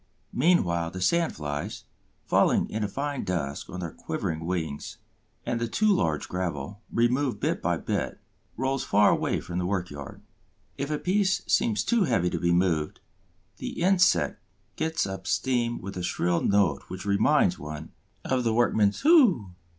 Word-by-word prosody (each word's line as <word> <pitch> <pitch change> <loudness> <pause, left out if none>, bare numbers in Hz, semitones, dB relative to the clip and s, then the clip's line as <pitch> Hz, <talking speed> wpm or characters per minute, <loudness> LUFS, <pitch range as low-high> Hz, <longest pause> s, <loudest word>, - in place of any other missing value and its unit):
Meanwhile, 90 - +2
the 95 - -7
sand 170 - +1
flies, 75 -1 -5 0.4
falling - - +3
in 110 0 -2
a - - 0
fine 140 +6 -3
dust 80 -7 -3
on 90 - -6
their 85 -2 -4
quivering 80 +1 -4
wings; 80 -5 -3 0.5
and 115 -1 -2
the 120 - 0
too 215 - +2
large 80 - 0
gravel, 90 +1 -4
removed 125 +3 +1
bit - - -1
by - - 0
bit, - - -3 0.4
rolls 130 +2 -1
far 105 +1 +4
away - - 0
from 90 0 -5
the 90 - -1
work 90 -3 -2
yard. 70 -1 -9 0.5
If 140 +1 -4
a 150 - 0
piece 190 +3 +1
seems 225 -3 +2
too 235 -5 +2
heavy 95 - +1
to - - -2
be 85 -1 +1
moved, 85 -4 +1 0.6
the - - -6
insect 180 0 +3 0.3
gets 160 +1 -1
up 95 -1 -6
steam 120 +3 0
with 100 +1 -7
a 90 - -4
shrill 90 -1 0
note 100 -8 +2
which 95 - -7
reminds 100 0 +3
one 75 +2 -7 0.3
of 130 -1 0
the 115 -2 +1
workman's 110 -4 +2
"Hoo!" 235 - +5
100 Hz, 165 wpm, -27 LUFS, 85-140 Hz, 0.6 s, Hoo